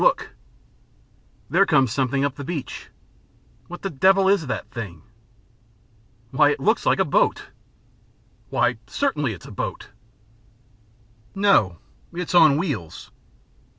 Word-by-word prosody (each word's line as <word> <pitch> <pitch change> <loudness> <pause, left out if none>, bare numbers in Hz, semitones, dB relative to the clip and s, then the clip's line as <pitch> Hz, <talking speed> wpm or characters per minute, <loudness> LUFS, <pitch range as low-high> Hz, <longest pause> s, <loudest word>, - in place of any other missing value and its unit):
Look!" - - +2 1.2
"There 190 +7 +3
comes 135 - +3
something 135 +2 0
up 140 - -2
the 140 - -8
beach." 145 -4 -6 0.8
"What 175 - -10
the 195 - -3
devil 190 +6 +3
is 195 -6 +2
that 125 - -5
thing?" 95 -9 -7 1.3
"Why 145 +2 +4
it 145 - -1
looks 220 +4 +1
like - - +4
a - - +2
boat." - - +1 1.0
"Why, - - +1
certainly 150 - -1
it's 90 - -12
a - - -10
boat." - - -5 1.5
"No, 195 - +3 0.4
it's 180 0 -4
on 155 -5 +6
wheels." 135 - -4
150 Hz, 120 wpm, -23 LUFS, 130-190 Hz, 1.5 s, on